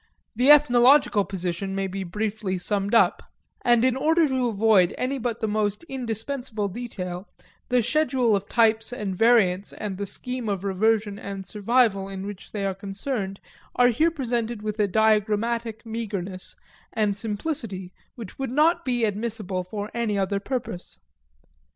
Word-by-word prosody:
The 250 +5 +3
ethnological 260 -6 +6
position 190 0 -4
may 195 0 -1
be 195 0 -4
briefly 205 +1 -3
summed 200 +3 +1
up; 230 - +4 0.4
and 240 0 +4
in 255 -1 +2
order 320 +4 +3
to 260 -2 0
avoid 210 -4 +3
any 270 +2 -1
but 235 -1 -3
the 220 - 0
most 210 +3 -1
indispensable 245 -4 -4
detail 190 -4 -6 0.4
the 250 -2 +3
schedule 260 -6 +2
of 200 0 -3
types 225 -1 +3
and 205 -6 -4
variants 200 -4 +3
and 200 -3 -5
the 200 - -3
scheme 250 +1 -3
of 195 -2 -2
reversion 205 +1 +1
and 195 -1 -6
survival 210 -1 +1
in 195 0 -6
which 200 -1 -8
they 200 -2 -3
are 195 - 0
concerned 195 +1 -4 0.4
are 245 0 +5
here 305 +8 +3
presented 240 -7 -3
with 215 0 -4
a 205 - +3
diagrammatic 220 +2 +1
meagerness 200 -5 -4 0.4
and 210 -3 +1
simplicity 205 - -4 0.2
which 225 -2 -10
would 270 - -2
not 320 +6 +3
be 245 -4 +1
admissible 210 -3 -3
for 205 +3 -6
any 230 -3 -1
other 195 +1 0
purpose. 220 -5 -5
215 Hz, 150 wpm, -25 LUFS, 195-240 Hz, 0.4 s, ethnological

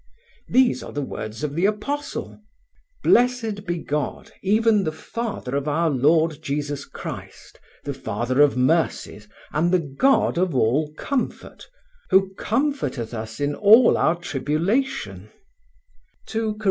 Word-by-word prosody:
These 255 -1 +3
are - - -8
the 145 - -3
words 110 -2 -6
of 145 -2 -2
the 170 +6 +2
Apostle: 280 +4 -4 0.6
"Blessed 230 -5 +2
be 175 - -1
God, 150 -3 -4
even 215 +1 +3
the 155 - -1
Father 200 - -5
of 140 +1 -2
our 160 +2 +1
Lord 155 +3 +2
Jesus 145 0 -3
Christ, - - -9 0.2
the 140 - -3
Father 130 +1 -1
of 145 -3 +4
mercies, 130 -6 0 0.2
and 165 +3 +1
the 185 - +5
God 170 - +1
of 180 -5 0
all 135 +6 +2
comfort; 275 -3 -4 0.4
who 190 0 +3
comforteth 230 - -2
us 115 0 -6
in 145 0 0
all 220 - +6
our 165 - +2
tribulation" 175 - -2 1.0
(2 220 -1 -2
Cor. - - -15
165 Hz, 135 wpm, -23 LUFS, 140-215 Hz, 1.0 s, all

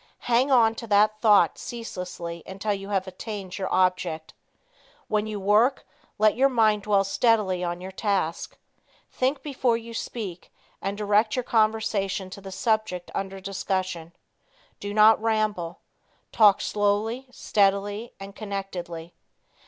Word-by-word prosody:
Hang 245 +3 +3
on 230 -4 +5
to 230 - -8
that 215 +1 +3
thought 210 -3 +4
ceaselessly 180 -7 -6
until 200 +2 -2
you 195 0 -6
have 195 -2 0
attained 190 0 -7
your 190 - -3
object. 180 -3 0 0.7
When 215 0 0
you 210 -1 -4
work, 215 +7 +3 0.3
let 215 0 +4
your 270 +3 +4
mind 220 -4 +3
dwell 200 -1 +2
steadily 195 -3 +1
on 175 0 -3
your 190 +1 -7
task. 190 -5 -2 0.5
Think 265 +1 -1
before 260 -5 +1
you 230 0 -9
speak 205 -6 -6 0.3
and 195 +1 -3
direct 210 +1 +2
your 255 - -1
conversation 215 -4 0
to 200 - -9
the 195 0 -9
subject 215 -5 -1
under 195 0 -4
discussion. 185 -3 -3 0.7
Do 205 - -5
not 215 +1 +6
ramble. 215 -6 -1 0.5
Talk 210 -3 +5
slowly, 210 +5 0
steadily 205 0 0
and 195 0 -9
connectedly. 185 -5 -6
205 Hz, 135 wpm, -25 LUFS, 190-220 Hz, 0.7 s, not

